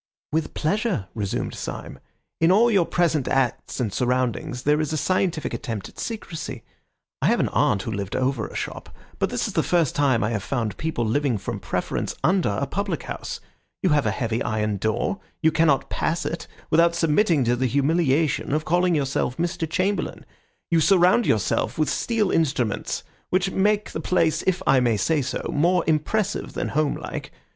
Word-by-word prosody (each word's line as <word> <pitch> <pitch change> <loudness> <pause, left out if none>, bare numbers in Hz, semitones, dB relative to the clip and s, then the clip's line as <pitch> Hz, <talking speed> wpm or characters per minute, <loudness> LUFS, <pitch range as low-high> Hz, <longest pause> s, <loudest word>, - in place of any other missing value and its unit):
"With 155 0 -1
pleasure," 180 - 0
resumed 100 -3 -2
Syme. - - -6 0.4
"In 165 +2 +4
all 230 +5 +5
your 190 -6 +3
present 160 -6 +1
acts 135 0 0
and 110 -6 -1
surroundings 125 +1 -1
there 150 +1 +3
is 155 - -2
a 155 - 0
scientific 180 -2 0
attempt 110 -5 -4
at - - -16
secrecy. 165 - -5 0.6
I - - +3
have - - +3
an - - +1
aunt 95 - +2
who 115 - -4
lived 100 -2 -3
over 130 -3 0
a - - -12
shop, - - -5 0.3
but - - +1
this - - -1
is - - -6
the - - +3
first 170 -6 +2
time 135 -6 +2
I 105 - 0
have 110 -3 -1
found 115 -1 -2
people 155 -7 -1
living 125 +1 +1
from - - -5
preference - - -2
under 185 - +3
a 110 +7 -1
public 200 +9 -3
house. - - -5 0.4
You 185 - +3
have 145 -6 +3
a - - +3
heavy 115 +2 -1
iron 105 -2 -1
door. 110 - -1 0.2
You 160 - +5
cannot 155 -3 +2
pass 165 +2 -1
it 165 - -4 0.2
without 170 +1 +4
submitting 165 -1 +3
to 120 +1 +2
the 130 +1 0
humiliation 140 0 +1
of 155 +1 0
calling 175 +1 +2
yourself 135 -3 -1
Mr. 170 -1 -2
Chamberlain. 195 +3 -1 0.5
You 165 - +4
surround 185 +5 +4
yourself 110 - +1
with 155 -3 +1
steel 220 -4 0
instruments 130 -9 0 0.3
which 185 +1 +1
make 205 +2 +1
the - - -4
place, 165 -3 +2
if 185 -1 +1
I 135 - +5
may 120 -3 +2
say 155 +7 +1
so, 130 - -3
more 175 +4 +3
impressive 190 +7 0
than - - -2
homelike. 150 -1 -2
155 Hz, 180 wpm, -24 LUFS, 125-175 Hz, 0.6 s, all